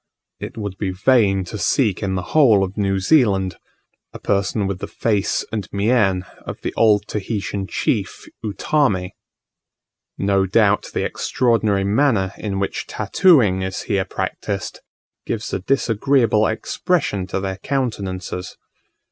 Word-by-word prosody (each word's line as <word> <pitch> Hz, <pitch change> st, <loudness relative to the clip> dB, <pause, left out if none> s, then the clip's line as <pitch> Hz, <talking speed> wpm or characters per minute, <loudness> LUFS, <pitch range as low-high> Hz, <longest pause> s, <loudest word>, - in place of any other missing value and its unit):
It -, -, -7 dB
would 100 Hz, -3 st, -5 dB
be 100 Hz, -, -1 dB
vain 95 Hz, 0 st, +3 dB
to 100 Hz, +4 st, -7 dB
seek 105 Hz, -2 st, +1 dB
in 95 Hz, -2 st, -1 dB
the 90 Hz, -, -2 dB
whole 115 Hz, -11 st, +5 dB
of 95 Hz, +1 st, -4 dB
New 100 Hz, -2 st, 0 dB
Zealand 95 Hz, -, +2 dB, 0.6 s
a -, -, -7 dB
person 100 Hz, +1 st, 0 dB
with 95 Hz, -1 st, -3 dB
the -, -, -5 dB
face 105 Hz, -4 st, 0 dB
and 105 Hz, -5 st, -3 dB
mien 100 Hz, -3 st, +2 dB
of -, -, -8 dB
the -, -, -3 dB
old 105 Hz, -2 st, +3 dB
Tahitian 100 Hz, -2 st, -3 dB
chief -, -, -2 dB, 0.2 s
Utamme. 105 Hz, -3 st, 0 dB, 1.1 s
No 100 Hz, -1 st, +1 dB
doubt 105 Hz, +1 st, +3 dB
the -, -, 0 dB
extraordinary 110 Hz, -5 st, +1 dB
manner 100 Hz, -3 st, +2 dB
in 100 Hz, -3 st, -3 dB
which 100 Hz, 0 st, -3 dB
tattooing 120 Hz, -, +3 dB
is 95 Hz, 0 st, -3 dB
here 100 Hz, -1 st, 0 dB
practised, 100 Hz, -2 st, -4 dB, 0.5 s
gives 110 Hz, -1 st, -3 dB
a -, -, 0 dB
disagreeable 115 Hz, 0 st, +2 dB
expression 110 Hz, -, -1 dB
to 95 Hz, -, -2 dB
their 95 Hz, -1 st, -3 dB
countenances. 95 Hz, -8 st, -3 dB
100 Hz, 135 wpm, -20 LUFS, 95-115 Hz, 1.1 s, whole